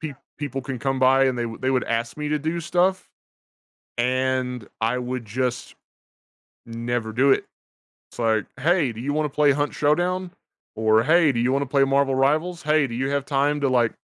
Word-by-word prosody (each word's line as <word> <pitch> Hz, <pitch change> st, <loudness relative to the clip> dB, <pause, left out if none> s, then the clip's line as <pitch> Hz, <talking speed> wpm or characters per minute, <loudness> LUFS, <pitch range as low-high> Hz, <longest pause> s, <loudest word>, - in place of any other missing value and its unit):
pe 155 Hz, -4 st, -5 dB, 0.2 s
people 135 Hz, -3 st, -4 dB
can 130 Hz, -3 st, -5 dB
come 135 Hz, 0 st, -1 dB
by 135 Hz, +1 st, +4 dB
and 130 Hz, -1 st, +1 dB
they 120 Hz, -, -1 dB
wou 115 Hz, -, -7 dB
they 130 Hz, -, -1 dB
would 130 Hz, -1 st, +1 dB
ask 115 Hz, 0 st, -2 dB
me 150 Hz, -1 st, -3 dB
to 150 Hz, -, 0 dB
do 160 Hz, +3 st, -2 dB
stuff, 180 Hz, +3 st, 0 dB, 0.9 s
and 125 Hz, -1 st, -1 dB
I 115 Hz, +3 st, 0 dB
would 125 Hz, -1 st, -4 dB
just 125 Hz, +3 st, -3 dB, 0.9 s
never 115 Hz, -1 st, -3 dB
do 135 Hz, +4 st, +3 dB
it. -, -, +2 dB, 0.7 s
It's -, -, -17 dB
like, 110 Hz, -2 st, +1 dB
"Hey, 155 Hz, -3 st, +2 dB
do 110 Hz, -, -9 dB
you 140 Hz, +4 st, -2 dB
wanna 150 Hz, 0 st, 0 dB
play 145 Hz, 0 st, +3 dB
Hunt 145 Hz, +1 st, -1 dB
Showdown?" 175 Hz, +5 st, 0 dB, 0.4 s
Or, 110 Hz, 0 st, +3 dB
"Hey, 160 Hz, +2 st, +4 dB
do 120 Hz, -, -3 dB
you 125 Hz, +2 st, +1 dB
wanna 140 Hz, +1 st, 0 dB
play 135 Hz, +1 st, +3 dB
Marvel 135 Hz, 0 st, +2 dB
Rivals? 155 Hz, +6 st, +1 dB
Hey, 150 Hz, -1 st, +2 dB
do 115 Hz, -, -7 dB
you 135 Hz, +3 st, -1 dB
have 140 Hz, -1 st, -1 dB
time 145 Hz, +1 st, +1 dB
to, 140 Hz, -, +1 dB
like, 120 Hz, -3 st, +2 dB
135 Hz, 195 wpm, -23 LUFS, 125-150 Hz, 0.9 s, by